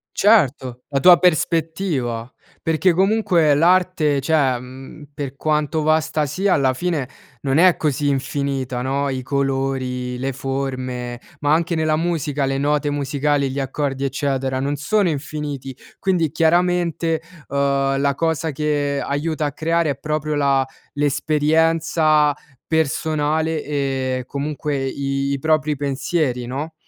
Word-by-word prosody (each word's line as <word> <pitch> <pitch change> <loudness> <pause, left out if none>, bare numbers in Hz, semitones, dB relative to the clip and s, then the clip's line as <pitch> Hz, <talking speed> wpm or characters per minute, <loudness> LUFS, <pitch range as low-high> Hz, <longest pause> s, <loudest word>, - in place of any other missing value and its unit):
Certo, 135 - +2
la 140 -2 0
tua 175 +4 +8
prospettiva, 160 -8 0 0.3
perché 165 +2 +2
comunque 185 -5 +3
l'arte 165 -3 +3
cioè, 135 -4 +2
mhmm, 130 +4 -11
per 140 -2 -6
quanto 150 +1 0
vasta 155 0 +1
sia, 190 +7 +1
alla 130 -2 +2
fine 155 -4 -2 0.3
non 135 0 +1
è 180 +1 +6
così 145 -1 0
infinita, 135 -2 -2
no, 140 +2 -1
i 130 -1 -3
colori, 135 -2 -2
le 135 +1 -1
forme, 130 -2 -4 0.2
ma 145 +1 +2
anche 170 +2 +1
nella 155 -1 +1
musica 155 -4 -1
le 135 0 -1
note 145 0 +1
musicali, 145 0 0
gli 135 - -3
accordi 135 0 -2
eccetera, 135 -1 -1
non 140 +2 -1
sono 185 +7 +1
infiniti; 145 -3 -5 0.2
quindi 180 -5 +1
chiaramente, 170 -1 +1 0.3
ehm, 140 -1 +1
la 140 0 +2
cosa 160 +1 -1
che 145 -1 -1
aiuta 150 +2 -2
a 145 - -1
creare, 165 +2 0
è 140 - -2
proprio 155 0 -2
la 140 -2 +2 0.3
l'esperienza 155 +1 +2 0.3
personale, 155 0 0
e 135 -3 -2
comunque 145 +1 -3
i 140 +1 -2
propri 155 -1 +1
pensieri, 135 -2 -1
no? 140 +6 -5
145 Hz, 125 wpm, -21 LUFS, 135-160 Hz, 0.3 s, tua